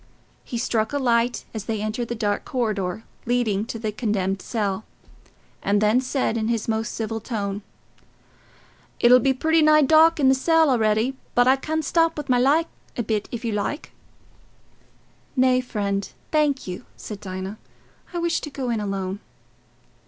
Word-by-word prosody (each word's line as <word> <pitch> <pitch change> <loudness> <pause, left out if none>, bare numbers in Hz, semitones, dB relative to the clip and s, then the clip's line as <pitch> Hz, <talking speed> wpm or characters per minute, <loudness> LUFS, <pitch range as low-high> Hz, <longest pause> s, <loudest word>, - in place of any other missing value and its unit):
He 240 - -5
struck 225 0 0
a - - +1
light 240 -2 +1
as 215 -3 -5
they 220 -2 -2
entered 215 +3 -2
the 235 - -3
dark 205 -2 -1
corridor 215 -5 -2 0.2
leading 225 -4 +1
to 230 - -5
the 220 -1 -3
condemned 200 -4 -1
cell, 210 -3 -2 0.8
and 205 +1 +2
then 215 +4 +3
said 255 -3 -1
in 220 -1 -1
his 230 -2 -1
most 225 +1 -1
civil 225 0 -3
tone, 205 -3 -3 1.4
"It'll 250 +1 +7
be 270 +3 +2
pretty 320 +5 +2
nigh 305 0 +6
dark 320 +3 +5
in 275 - +4
the 265 - +6
cell 320 +2 +3
a'ready, 225 +2 +2 0.2
but 245 +1 +5
I 260 - +6
can 315 +3 -2
stop 330 +2 +2
with 295 -2 -5
my 250 -1 +4
light 290 +6 +4 0.3
a 240 - 0
bit, 215 -1 -2
if 235 0 -5
you 230 - 0
like." 210 +9 -3 1.4
"Nay, 255 -1 +4
friend, 200 -5 -2 0.2
thank 295 -3 +2
you," 180 -1 -6
said 210 -2 -7
Dinah. 190 +2 -6 0.5
"I 350 - -4
wish 340 -1 0
to 300 - -6
go 265 -3 -3
in 225 - 0
alone." 195 -1 -3
235 Hz, 165 wpm, -23 LUFS, 210-265 Hz, 1.4 s, It'll